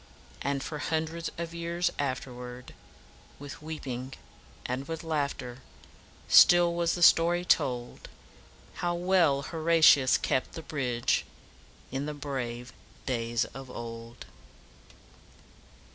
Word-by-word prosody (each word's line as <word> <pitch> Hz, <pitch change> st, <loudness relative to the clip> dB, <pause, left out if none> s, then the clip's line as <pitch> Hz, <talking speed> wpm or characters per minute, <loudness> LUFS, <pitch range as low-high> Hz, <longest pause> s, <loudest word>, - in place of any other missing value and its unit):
And 140 Hz, 0 st, -1 dB
for 150 Hz, -, -5 dB
hundreds 160 Hz, +2 st, -2 dB
of 170 Hz, 0 st, -5 dB
years 170 Hz, +1 st, -1 dB
afterwards 125 Hz, -2 st, -5 dB, 0.7 s
"With 145 Hz, 0 st, -9 dB
weeping 135 Hz, -5 st, -6 dB, 0.5 s
and 130 Hz, +2 st, -3 dB
with 165 Hz, 0 st, -5 dB
laugh 150 Hz, -3 st, -1 dB
ter, 125 Hz, -1 st, -8 dB, 0.7 s
Still 175 Hz, -1 st, +7 dB
was 170 Hz, -1 st, 0 dB
the 175 Hz, -, 0 dB
story 175 Hz, +2 st, +5 dB
told, 125 Hz, -8 st, 0 dB, 0.7 s
How 175 Hz, 0 st, 0 dB
well 175 Hz, -6 st, +2 dB
Horatius 160 Hz, -5 st, +5 dB
kept 130 Hz, -, -1 dB
the 165 Hz, -, -7 dB
bridge 125 Hz, -6 st, 0 dB, 0.7 s
In 135 Hz, +3 st, -3 dB
the 150 Hz, -, -4 dB
brave 125 Hz, -4 st, -5 dB, 0.3 s
days 115 Hz, -1 st, 0 dB
of 135 Hz, -1 st, -9 dB
old." 115 Hz, 0 st, -8 dB
140 Hz, 110 wpm, -29 LUFS, 125-165 Hz, 0.7 s, Still